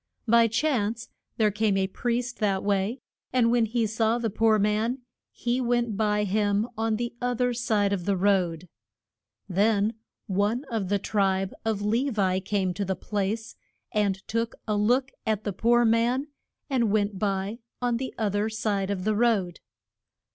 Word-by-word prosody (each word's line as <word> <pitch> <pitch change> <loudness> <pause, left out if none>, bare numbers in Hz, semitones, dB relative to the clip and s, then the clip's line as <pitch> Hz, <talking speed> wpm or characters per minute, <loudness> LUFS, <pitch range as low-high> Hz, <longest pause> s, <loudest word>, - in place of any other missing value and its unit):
By 230 +1 +6
chance 230 -3 0 0.3
there 215 -2 +3
came 210 -1 +1
a 190 - +2
priest 240 +5 -2
that 200 -3 +1
way, 200 +4 0 0.3
and 240 -2 +3
when 240 -1 +3
he 230 +1 0
saw 220 +2 +1
the 230 -3 -2
poor 220 +1 +3
man 215 +5 0 0.3
he 245 +2 -1
went 240 -3 0
by 210 0 +1
him 205 +1 +1
on 225 0 0
the 240 +2 -3
oth 245 -1 -1
er 245 0 +2
side 215 -4 +1
of 180 -3 -3
the 200 -1 +1
road. 180 -3 +1 0.8
Then 205 +3 +2 0.3
one 205 +5 0
of 210 -5 -2
the 205 - +2
tribe 195 -2 0
of 220 -2 -1
Le 230 +7 +1
vi 190 -4 +1
came 190 -1 -1
to 200 - -2
the 190 -1 -1
place, 210 +4 -3 0.4
and 200 -2 0
took 230 0 -1
a 210 - +1
look 250 +6 +2 0.2
at 215 -1 0
the 205 - -2
poor 240 +5 +3
man, 235 +4 +2 0.4
and 250 -6 +1
went 205 -2 0
by 200 +2 -1 0.2
on 245 -1 0
the 260 +1 -4
oth 210 -3 0
er 210 +2 +1
side 205 -3 -1
of 195 -2 -2
the 215 +2 +1
road. 205 -7 +1
215 Hz, 170 wpm, -26 LUFS, 200-235 Hz, 0.8 s, By